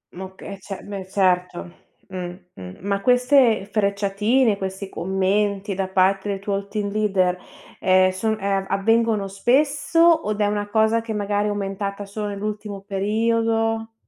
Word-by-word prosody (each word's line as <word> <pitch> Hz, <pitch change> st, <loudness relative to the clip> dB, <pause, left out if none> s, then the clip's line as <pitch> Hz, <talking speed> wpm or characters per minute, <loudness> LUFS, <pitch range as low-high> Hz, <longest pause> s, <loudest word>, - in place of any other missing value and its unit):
M -, -, -9 dB
oka 190 Hz, 0 st, -13 dB
eh 200 Hz, -, -7 dB
c -, -, -16 dB, 0.2 s
beh 195 Hz, -2 st, -5 dB
certo. 180 Hz, -2 st, 0 dB, 0.4 s
Mh-mh, 175 Hz, -, -8 dB
ma 200 Hz, +1 st, -1 dB
queste 250 Hz, -3 st, +3 dB
frecciatine, 210 Hz, +3 st, +1 dB
questi 190 Hz, 0 st, -5 dB
commenti 195 Hz, +3 st, -1 dB
da 190 Hz, 0 st, -2 dB
parte 190 Hz, +1 st, +2 dB
del 195 Hz, -1 st, -2 dB
tuo 200 Hz, 0 st, -3 dB
team 205 Hz, -1 st, -3 dB
leader, 195 Hz, -4 st, +1 dB, 0.4 s
ehm, 185 Hz, 0 st, +4 dB
son 220 Hz, +4 st, -1 dB
ehm, 195 Hz, -1 st, -1 dB
avvengono 225 Hz, 0 st, +1 dB
spesso 280 Hz, -, +1 dB, 0.3 s
od 210 Hz, 0 st, -2 dB
è 210 Hz, -, +3 dB
una 205 Hz, 0 st, -1 dB
cosa 220 Hz, +2 st, +2 dB
che 225 Hz, -1 st, -5 dB
magari 205 Hz, 0 st, -1 dB
è -, -, 0 dB
aumentata 200 Hz, 0 st, -4 dB
solo 210 Hz, +1 st, -5 dB
nell'ultimo 205 Hz, 0 st, -5 dB
periodo? 225 Hz, +2 st, 0 dB
200 Hz, 145 wpm, -22 LUFS, 195-220 Hz, 0.4 s, ehm